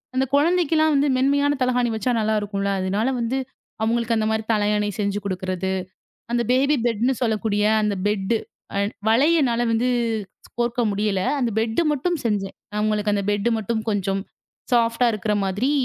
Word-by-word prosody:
அந்தக் 265 +1 0
குழந்தைக்கு 330 +2 +2
எல்லாம் 310 -1 +3
வந்து 285 +1 +3
மென்மையான 285 +2 +2
தலைகாணி 250 -1 +2
வச்சா 250 +3 -1
நல்லா 220 0 +1
இருக்கும்ல. 200 -1 -2
அதனால 200 +6 0
வந்து 235 +3 -1 0.5
அவங்களுக்கு 230 +1 +1
அந்த 215 - 0
மாதிரி 220 0 -1
தலையாணி 210 0 +1
செஞ்சு 200 0 0
குடுக்குறது. 185 0 -2 0.6
அந்த 240 0 +1
பேபி 275 +4 +3
பெட்ன்னு 235 +4 +1
சொல்லக்கூடிய 215 -2 0 0.2
அந்த 210 -1 0
பெட் 205 +1 0 0.4
அ - - +2 0.3
வளையனால 265 -1 +3
வந்து 235 +3 +1 0.7
கோர்க்க 240 0 0
முடியல. 200 -2 0 0.2
அந்த 245 -3 +1
பெட் 225 +8 0
மட்டும் 340 +5 -1
செஞ்சேன். 200 -3 -1 0.2
அவங்களுக்கு 210 0 +1
அந்த 200 - -1
பெட் 205 +3 +1
மட்டும் 220 +1 -2
கொஞ்சம் 195 -1 -1 0.5
சாஃப்ட்டா 230 +1 +3
இருக்குற 210 0 -1
மாதிரி 205 +9 0
225 Hz, 150 wpm, -23 LUFS, 205-255 Hz, 0.7 s, எல்லாம்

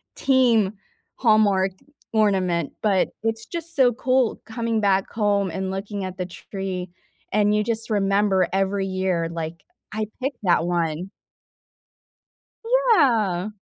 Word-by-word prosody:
team 235 -7 +3 0.4
Hallmark 205 -4 +3 0.4
ornament. 190 -7 +1
But 200 -4 +2
it's 225 0 -2
just 335 0 -6
so 250 -4 +4
cool 255 -1 +1
coming 230 -1 -2
back 195 -1 +1
home 205 -3 +1
and 190 +2 -3
looking 200 +1 -4
at 185 0 -6
the 180 - -2
tree, 185 -1 -6 0.4
and 210 0 +3
you 210 - +2
just 225 0 -3
remember 200 -2 +2
every 195 0 0
year 185 -3 -1
like, 165 0 -6 0.3
"I 215 0 -2 0.2
picked 270 -2 -2
that 175 -2 +3
one." 170 +1 -1 1.6
Yeah. 255 - +3
200 Hz, 125 wpm, -23 LUFS, 190-225 Hz, 1.6 s, so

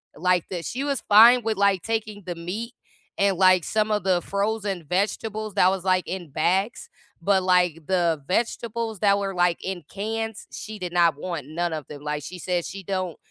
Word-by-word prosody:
like, 180 +1 +1
that 175 -3 -5
she 260 +3 -3
was 280 -2 -1
fine 230 +4 +8
with, 220 -2 -1
like, 200 -3 +2
taking 215 -2 -3
the 180 - -3
meat 200 +8 -5 0.5
and, 200 -2 +2
like, 185 -1 +5
some 215 +3 0
of 210 -2 0
the 185 -2 +2
frozen 200 -2 -2
vegetables 215 +3 -1
that 185 -2 +5
was, 190 -1 -2
like, 185 -1 +2
in 180 -3 -5
bags, 190 - 0 0.3
but, 190 +1 +2
like, 180 -3 +2
the 170 -5 +1
vegetables 230 +1 -1
that 200 -1 +4
were, 195 -1 -3
like, 175 -1 +1
in 190 -2 -4
cans, 220 +2 -4
she 215 -1 -7
did 180 -2 -4
not 170 -3 +4
want 170 -6 -4
none 170 +3 -2
of 155 -3 -5
them. 145 -1 -10
Like, 150 0 -3
she 180 +4 -8
says 175 0 -1
she 195 - -7
don't 185 -3 -3
190 Hz, 195 wpm, -24 LUFS, 175-215 Hz, 0.5 s, fine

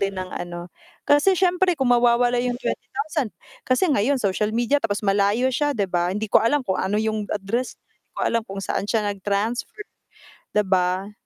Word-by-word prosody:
din 195 -1 -1
ng 185 0 -5
ano. 175 0 -6 0.3
Kasi 290 +7 +4
siyempre 360 -1 +2
kung 265 -3 +2
mawawala 240 0 +3
'yong 245 0 -1
20,000 280 +1 -3 0.4
kasi 255 +7 +3
ngayon 275 +4 +2
social 210 -3 0
media, 240 +5 +2
tapos 210 -2 -2
malayo 205 +6 +2
siya, 290 +2 0
'di 205 - +1
ba? 175 -2 0
Hindi 205 +4 -2
ko - - +7
alam 270 +4 +1
kung 190 -5 -1
ano 190 +2 0
'yong 215 -1 -1
address 210 +5 -2
niya, - - -53 0.2
'di - - -52
ko - - -3
alam 230 0 +1
kung 195 0 -5
saan 205 - -2
siya 220 -1 +1
nag 200 - -13
transfer 220 - -2 0.7
'di 210 - +4
ba? 185 +1 0
220 Hz, 190 wpm, -23 LUFS, 200-255 Hz, 0.7 s, ko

